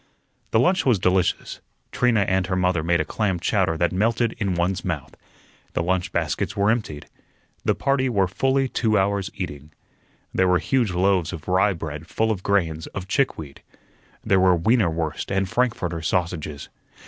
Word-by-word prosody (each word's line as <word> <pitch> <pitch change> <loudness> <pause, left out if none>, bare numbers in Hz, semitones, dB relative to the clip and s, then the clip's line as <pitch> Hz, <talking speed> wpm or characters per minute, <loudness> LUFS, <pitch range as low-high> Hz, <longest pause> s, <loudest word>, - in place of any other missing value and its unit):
The 110 - +2
lunch 180 +6 +3
was 125 -5 +3
delicious. 90 0 0 0.3
Trina 120 -4 +2
and 95 -1 +1
her 95 - -1
mother 90 -2 +1
made 85 +2 +1
a 80 - 0
clam 95 +1 -1
chowder 90 -2 +1
that 85 +1 +1
melted 115 +4 +1
in 95 -3 0
one's 90 +3 -1
mouth. 80 -6 -4 0.6
The - - 0
lunch 90 0 -1
baskets 100 - -2
were 100 +2 +3
emptied. 105 -11 -3 0.6
The - - +2
party 135 -1 +1
were 100 -5 +2
fully 135 +8 +1
two 110 -4 +1
hours 100 0 0
eating. 75 -5 -6 0.6
There 95 - +2
were 90 0 +4
huge 125 +2 +1
loaves 90 -2 +1
of 80 -3 -8
rye 95 +2 +3
bread 80 -1 -7
full 110 +3 0
of 100 -4 -3
grains 85 -6 0
of 95 -1 -5
chickweed. 80 - -2 0.6
There 95 - +3
were 90 -1 +5
weiner 105 +3 +2
wurst 80 +1 -3
and 95 0 +1
frankfurter 90 -8 -1
sausages. 80 -3 -2
95 Hz, 170 wpm, -23 LUFS, 85-105 Hz, 0.6 s, were